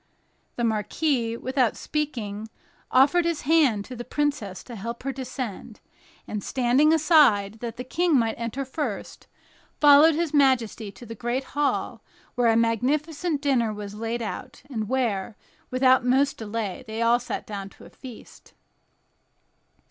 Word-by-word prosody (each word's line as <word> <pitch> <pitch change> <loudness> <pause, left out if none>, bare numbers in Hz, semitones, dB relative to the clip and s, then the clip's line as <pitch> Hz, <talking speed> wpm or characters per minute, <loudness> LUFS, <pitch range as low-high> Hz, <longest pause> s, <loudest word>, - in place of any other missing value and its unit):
The 240 - -3
marquis, 230 +2 0
without 255 -1 0
speaking, 225 -9 -4 0.4
offered 285 +7 +4
his 335 -2 -1
hand 275 -9 +3
to 255 - -8
the 240 - -6
princess 265 -10 -2
to 240 - -9
help 230 +4 -6
her 275 - -2
to - - -20
descend, 250 -5 -6 0.5
and, 210 -2 -4
standing 260 +4 +3
aside 275 - +4
that 235 -1 -6
the 250 - -4
King 330 +4 +1
might 225 -2 +1
enter 235 +4 -4
first, 260 -6 -5 0.5
followed 295 +2 +7
his 330 -1 -1
majesty 240 -7 +2
to 200 +5 -13
the 230 - -7
great 240 +4 -2
hall, 290 0 -1 0.3
where 245 -2 +2
a 225 - +3
magnificent 285 - 0
dinner 245 -6 +2
was 205 -1 -7
laid 230 +2 -3
out, 215 - -7
and 220 -4 -3
where, 225 -6 -1 0.3
without 255 0 +4
more 260 +3 +4
delays 215 -3 -5
they 220 +1 -2
all 235 +1 +4
sat 245 - -5
down 200 -2 -6
to - - -16
feast. 250 -4 -13
245 Hz, 150 wpm, -25 LUFS, 225-285 Hz, 0.5 s, followed